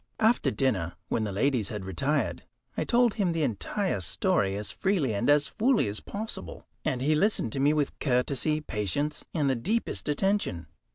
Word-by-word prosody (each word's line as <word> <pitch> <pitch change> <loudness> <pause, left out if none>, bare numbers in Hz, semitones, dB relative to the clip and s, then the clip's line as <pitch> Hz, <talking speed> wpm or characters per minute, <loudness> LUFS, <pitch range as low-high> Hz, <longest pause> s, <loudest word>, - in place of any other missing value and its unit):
After 225 +2 +3
dinner, 95 - 0 0.2
when 110 - 0
the 105 - -3
ladies 115 +1 +1
had 105 -3 -5
retired, 135 +6 -1 0.3
I - - -1
told 240 -2 +3
him 190 -6 0
the 165 -1 0
entire 140 - -1
story 95 +3 +1
as 105 0 -3
freely 175 - 0
and 110 +6 0
as 145 -1 +5
fully 230 - +2
as 105 +1 -3
possible, 200 - -7 0.2
and 125 0 -1
he 155 +3 +3
listened 155 - +2
to - - -2
me 140 +2 +4
with 150 -2 -1
courtesy, 140 +3 +1
patience, 140 - -2
and 150 -4 +2
the 135 - +2
deepest 210 - -1
attention. 190 - 0
140 Hz, 175 wpm, -28 LUFS, 105-175 Hz, 0.3 s, as